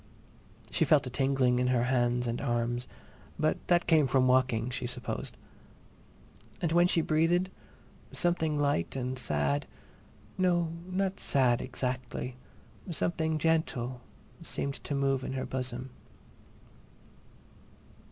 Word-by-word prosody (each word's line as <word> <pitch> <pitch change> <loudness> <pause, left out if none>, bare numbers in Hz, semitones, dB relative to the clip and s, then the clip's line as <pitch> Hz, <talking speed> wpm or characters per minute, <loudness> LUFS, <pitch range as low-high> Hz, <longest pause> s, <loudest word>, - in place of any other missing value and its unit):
She - - +2
felt 150 -2 +4
a 125 - -5
tingling 130 -2 +2
in 125 - +2
her 125 -2 +2
hands 125 -1 +1
and 120 0 -2
arms, 120 +1 -1 0.5
but - - +1
that 175 -1 +3
came 155 -4 +4
from 130 0 +3
walking, 125 -2 +2
she 125 0 -3
supposed. 125 - -5 1.2
And 170 - 0
when 175 +1 +5
she 170 - +3
breathed, 165 +4 +2 0.6
something 160 -4 +1
light 140 - 0
and 130 0 -3
sad—no, 125 - -2 0.2
not 190 +1 -1
sad, 125 -3 +2
exactly—something 130 +6 -4
gentle 140 -6 0 0.4
seemed 140 0 -4
to 145 - -2
move 135 -1 +1
in 135 - -4
her 130 - -2
bosom. 130 0 -4
130 Hz, 115 wpm, -30 LUFS, 125-160 Hz, 1.2 s, when